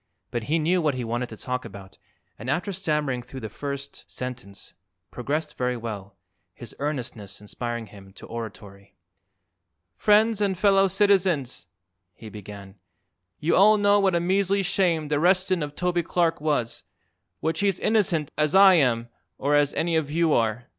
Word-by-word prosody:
But 120 -2 -3
he 160 +6 +1
knew 170 +3 +1
what 150 -4 +1
he 125 - -3
wanted 120 +2 -3
to 110 - -10
talk 125 +2 -4
about 95 -1 -12 0.4
and 115 +4 -6
after 180 +8 -1
stammering 150 -8 -1
through 130 +2 -10
the 110 - -5
first 140 -1 -6
sentence, 125 -6 -8 0.4
progressed 150 +5 -3
very 125 0 0
well, 105 -4 -7 0.4
his - - -8
earnestness 125 -8 -4
inspiring 115 +2 -5
him 100 -2 -15
to - - -12
oratory. 100 -4 -9 1.0
"Friends 215 +1 +3
and 195 -3 +1
fellow 195 0 +4
citizens," 190 - +1 0.5
he 110 - -11
began; 100 -1 -11 0.6
"you 160 - +1
all 210 +3 +6
know 205 0 +4
what 190 -3 +2
a - - +3
measly 195 +2 +1
shame 175 -5 +1
the 145 0 0
arrestin' 185 +1 +2
of 145 0 -5
Toby 180 -1 0
Clark 165 -1 0
was, 145 -7 -1 0.6
which 160 +1 -1
he's 200 -2 +1
innocent 185 -9 +1
as 150 +3 +2
I 195 0 +8
am 120 -8 +2 0.3
or 145 +2 0
as 145 -1 +3
any 165 0 0
of 160 -3 0
you 165 0 +2
are. 115 +1 0
150 Hz, 160 wpm, -25 LUFS, 120-180 Hz, 1.0 s, I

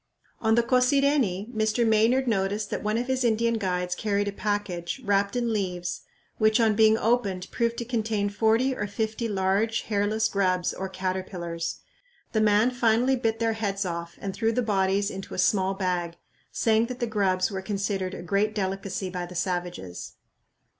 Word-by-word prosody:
On 220 0 +3
the 235 - +4
Cosireni 250 -5 +2
Mr. 220 +1 +1
Maynard 230 +4 +3
noticed 205 -1 0
that - - -2
one 215 +1 0
of 240 - -1
his 260 0 0
Indian 230 0 +2
guides 180 -2 -1
carried 205 +1 -1
a - - -1
package, 205 -2 -3
wrapped 200 +1 +1
in 235 -2 0
leaves, 180 -4 -2 0.4
which 215 +1 +4
on 225 -2 +4
being 220 +1 +5
opened 205 -6 0
proved 235 -1 0
to 235 - -3
contain 220 -3 -1
forty 225 +5 +2
or 210 - -3
fifty 220 +3 -2
large 200 +3 +1
hairless 215 +1 0
grubs 185 -3 0
or 190 0 -5
caterpillars. 185 -3 -4 0.5
The 220 - +1
man 215 +3 +4
finally 245 +1 +2
bit 225 -3 0
their 225 0 +1
heads 200 -3 -2
off 170 -1 -5
and 195 -1 -4
threw 225 +2 +1
the 245 +2 0
bodies 200 -1 +1
into 195 0 -7
a - - -7
small 190 +1 +2
bag, 180 -3 -2 0.4
saying 225 0 +2
that 250 0 -6
the 240 - 0
grubs 195 -4 +1
were 190 -1 -3
considered 195 -1 -2
a - - -7
great 205 +4 0
delicacy 190 -1 -3
by 180 -1 -4
the 180 - -11
savages. 175 - -4
205 Hz, 175 wpm, -26 LUFS, 190-225 Hz, 0.5 s, being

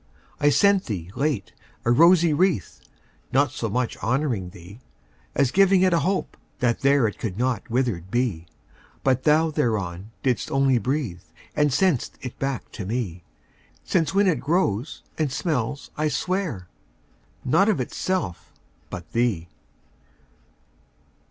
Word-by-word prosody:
I 145 - +4
sent 195 +7 +4
thee, 95 -6 -5
late, 140 -8 -1 0.3
a 120 - +3
rosy 170 +4 +6
wreath, 170 - 0 0.5
Not 135 -1 +3
so 115 - -3
much 125 +3 -1
honouring 120 -5 -1
thee, 90 +4 -13 0.6
As 140 -3 +2
giving 195 0 +5
it 185 -1 +4
a 170 - +4
hope, 185 +5 -1 0.2
that 120 -2 +1
there 140 -2 +4
It 105 - -6
could 100 -5 -4
not 125 -1 -1
withered 115 -8 -1
be. 105 -8 -1 0.6
But 130 -1 +1
thou 155 +1 +4
thereon 105 - -1
didst 130 -3 0
only 135 -2 +3
breathe, 125 - -2 0.3
And 150 -1 +3
sent'st 150 -2 +1 0.2
back 135 -1 -3
to 105 - -6
me: 95 -5 -3 0.6
Since 160 -3 +1
when 200 +1 +4
it 180 -5 +2
grows, 145 - -1 0.2
and 150 -4 +1
smells, 140 -3 -2
I 155 +1 0
swear, 150 - -2 0.8
Not 165 +11 +4
of 205 - +1
itself, 130 - -3 0.4
but 85 -3 -8
thee. 105 -8 0
130 Hz, 135 wpm, -24 LUFS, 110-155 Hz, 0.8 s, rosy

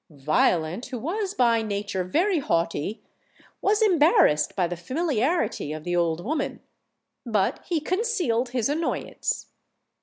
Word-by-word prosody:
Violent, 155 - +1
who 250 0 -5
was 375 - -3
by 235 -2 +3
nature 200 -3 -2
very 340 - +1
haughty, 170 - -1 0.6
was 415 +2 +3
embarrassed 310 - +4
by 185 - +2
the 175 +1 -3
familiarity 265 - -1
of 155 0 -6
the 175 +1 -1
old 170 0 0
woman; 300 +4 -2 0.6
but 215 -6 0
he 340 -3 +1
concealed 345 - 0
his 245 -3 0
annoyance. 310 +4 -2
235 Hz, 125 wpm, -25 LUFS, -, 0.6 s, embarrassed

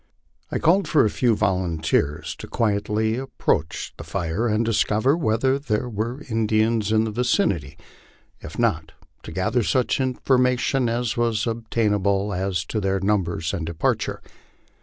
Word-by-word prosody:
I - - -1
called 190 +5 +3
for 150 -7 +4
a 105 - +1
few 120 -3 +2
volunteers 85 -7 0
to - - -8
quietly 110 +1 0
approach 125 - -2
the - - -7
tire 95 +5 -2
and 110 +1 +1
discover 115 +4 +2
whether 130 -2 +1
there 125 -4 -1
were 120 +5 -4
Indians 110 -1 +1
in 110 0 +3
the 110 - -2
vicinity; 105 - 0 0.6
if 80 - -9
not, 85 -10 0 0.3
to - - -9
gather 95 +8 0
such 130 +4 +1
information 125 0 +1
as 120 -1 -1
was 115 -2 +1
obtainable, 105 -3 0
as 90 -3 -1
to 110 +5 -3
their 95 0 0
numbers 95 -4 0
and 90 -5 -2
departure. 80 0 -1
110 Hz, 140 wpm, -23 LUFS, 95-120 Hz, 0.6 s, for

